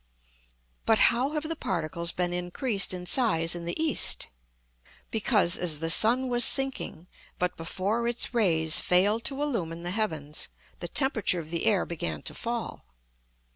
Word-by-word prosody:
But 225 - +4 0.2
how 260 +5 -2
have 305 -1 -3
the 330 - -3
particles 170 - 0
been 175 -1 -2
increased 190 +5 0
in 180 -1 -5
size 170 -8 +2
in 170 -1 -6
the 170 - -4
east? 315 -2 +1 0.8
Because, 210 -5 +2
as 165 -4 +1
the 165 +2 0
sun 245 +8 +3
was 245 -1 +4
sinking, 270 - +2 0.3
but 180 0 -2
before 195 +8 -2
its 240 +1 -2
rays 165 -8 +3
failed 205 +5 +1
to 275 -1 -2
illumine 170 - -3
the 175 - -4
heavens, 160 -8 -3 0.3
the - - -5
temperature 235 -10 +1
of 160 -1 -9
the 170 +5 -2
air 205 -4 +2
began 80 - -5
to - - -3
fall. 235 0 -5
185 Hz, 155 wpm, -27 LUFS, 170-235 Hz, 0.8 s, But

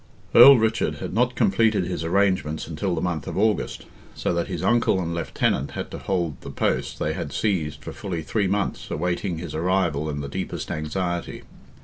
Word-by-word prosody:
Earl 135 +3 +10
Richard 110 0 +1
had - - -6
not 125 +3 +1
completed 110 - +2
his 90 -2 -3
arrangements 85 -4 +1
until 85 +3 -2
the 80 - -2
month 85 -5 -2
of - - -4
August—so 105 -3 -2
that 85 0 -1
his 90 -2 -4
uncle 115 -2 +3
and 85 -2 -2
lieutenant 80 -4 -1
had - - -5
to - - -6
hold 85 -6 -2
the - - -8
post - - -1
they - - -1
had - - -5
seized 80 -8 -1
for - - -7
fully 95 -8 -4
three 100 +2 0
months, 100 +1 -2
awaiting 90 +1 -2
his 80 -2 -6
arrival 85 -3 0
in 70 -1 -3
the 70 - -5
deepest 70 - -4
anxiety. 85 +3 -3
90 Hz, 185 wpm, -24 LUFS, 80-100 Hz, -, Earl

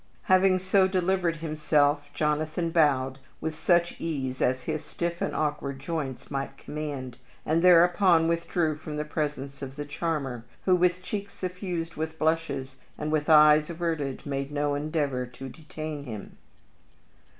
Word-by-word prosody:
Having 185 0 +4
so 185 +1 +3
delivered 185 -2 +1
himself, 150 -2 +1
Jonathan 155 +3 -1
bowed 135 -5 +2 0.2
with 160 - -3
such 170 +2 +1
ease 135 -6 -3
as 130 0 +1
his 155 +2 -3
stiff 170 0 -4
and - - -1
awkward 145 -2 -1
joints 140 -4 -4
might 140 0 -3
command, 140 -5 -6 0.3
and 160 +2 +2
thereupon 175 -1 +6
withdrew 165 -2 0
from 150 -1 -6
the 150 - -2
presence 145 -3 -3
of 135 -1 -6
the 145 0 -5
charmer, 145 -5 -3 0.2
who, 185 - +5
with 180 0 +2
cheeks 200 +1 -5
suffused 180 -3 -4
with 160 +1 -3
blushes 155 -5 -1 0.2
and 150 0 -3
with 155 -1 0
eyes 150 0 +7
averted, 160 -5 -3
made 140 0 -3
no 145 0 0
endeavor 145 -4 -1
to 125 +2 -9
detain 155 0 -7
him. 110 -5 -8
155 Hz, 145 wpm, -27 LUFS, 145-170 Hz, 0.3 s, eyes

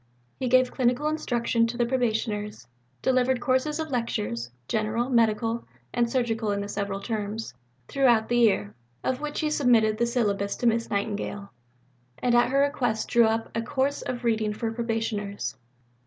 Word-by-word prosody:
He 260 - -1
gave 255 +1 +4
clinical 250 +3 +1
instruction 240 -6 +1
to 240 +1 -5
the 240 - +2
Probationers; 220 - -1 0.4
delivered 255 0 +2
courses 260 +4 +1
of 315 -2 -3
lectures 120 - -2 0.2
general, 225 +4 -1
medical, 230 0 +1 0.3
and 240 -1 +1
surgical 225 -4 0
in 200 - -1
the 200 - -4
several 200 -1 -3
terms 215 - -4 0.3
throughout 240 -5 +3
the 240 0 +2
year, 150 - +3 0.3
of 260 +2 -1
which 300 +1 -3
he 305 -1 0
submitted 230 -7 +3
the 235 - +2
syllabus 205 -4 0
to 245 - -4
Miss 230 0 +2
Nightingale, 200 0 -3 0.7
and 245 - +1
at 240 +1 +4
her 275 +1 +3
request 250 -6 0
drew 235 -1 +5
up 225 +1 0
a 230 - +1
"Course 265 +4 -1
of 245 -1 -4
Reading 220 -2 +1
for 225 +1 -3
Probationers." 220 - -2
230 Hz, 160 wpm, -26 LUFS, 215-250 Hz, 0.7 s, drew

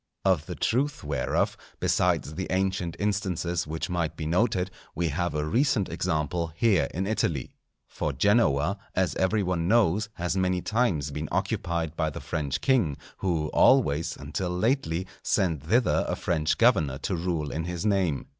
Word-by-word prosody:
Of 90 -6 +2
the - - -5
truth 135 +5 0
whereof, 70 -3 0 0.2
besides 75 - +1
the 95 +4 -4
ancient 95 -2 0
instances 90 -5 -1
which 80 +1 -3
might 85 -3 -2
be 80 - -4
noted, 90 +2 +1 0.2
we 85 0 0
have 90 +2 -2
a 75 0 0
recent 115 - +1
example 80 +2 -1
here 95 -7 +3
in 95 +3 -2
Italy. 85 - -1 0.3
For 75 - -3
Genoa, 90 - +2 0.2
as 95 -1 +1
every 100 +3 +2
one 90 -2 -1
knows, 105 -1 +3
has 85 0 -2
many 90 -1 +1
times 105 -11 0
been 75 +1 -4
occupied 85 -2 -1
by 80 -2 0
the - - -7
French 75 -3 -3
king, 115 - +2 0.2
who 80 -5 -1
always, 85 - +3
until 75 +5 -3
lately, 90 - 0 0.2
sent 85 -8 +1
thither 120 +7 +3
a - - -1
French 80 -3 0
governor 70 -4 +3
to 90 +6 -2
rule 85 -4 -2
in 80 +1 -3
his 90 +2 -4
name. 95 -8 +1
90 Hz, 160 wpm, -27 LUFS, 75-95 Hz, 0.3 s, here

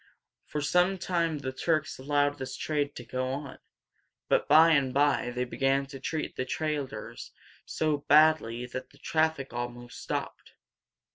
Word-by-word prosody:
For 150 - -3
some 180 +5 +2
time 170 -4 0
the 135 -2 -4
Turks 155 +2 -1
allowed 145 +1 +1
this 130 0 -5
trade 145 -2 -1
to 120 - -8
go 130 +2 -2
on, 135 +1 -5 0.7
but - - +2
by 160 +3 +7
and 140 -4 +3
by 145 -2 +2
they 125 +1 -2
began 135 +2 +1
to 135 0 -10
treat 155 +4 -3
the - - -1
traders 130 -5 -4 0.4
so 155 -2 0
badly 145 -5 +4
that 130 +1 -7
the - - -21
traffic 155 -4 0
almost 120 0 -6
stopped. - - -5
140 Hz, 150 wpm, -29 LUFS, 130-155 Hz, 0.7 s, by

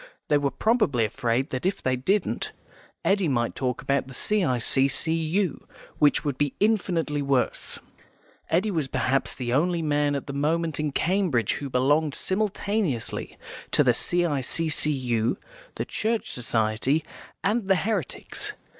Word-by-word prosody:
They 145 - +4
were 140 -1 +1
probably 210 - +2
afraid 120 +4 -1
that 130 -1 -3
if 190 +2 -1
they 130 0 +2
didn't 185 +10 0 0.5
Eddy 195 -2 +3
might 120 -4 0
talk 125 -2 -2
about 140 -1 0
the 130 - -10
C.I.C.C.U., 160 - 0 0.3
which 150 +1 +4
would 140 -3 -2
be 145 -2 0
infinitely 180 -8 +1
worse. 135 -2 0 0.7
Eddy 185 +6 +2
was 160 -7 -1
perhaps 130 +1 0
the 120 -2 -2
only 170 +4 +2
man 145 -1 +1
at 140 - -3
the 140 - -6
moment 160 +3 0
in 150 0 0
Cambridge 165 - +1
who 140 - -4
belonged 145 +4 +2
simultaneously 200 - -1 0.3
to - - +4
the - - +4
C.I.C.C.U., 145 -6 +1 0.4
the - - -2
Church 225 +1 -1
Society, 120 +5 0 0.4
and 210 0 +1
the 195 - +5
Heretics. 185 - -2
145 Hz, 135 wpm, -26 LUFS, 130-180 Hz, 0.7 s, the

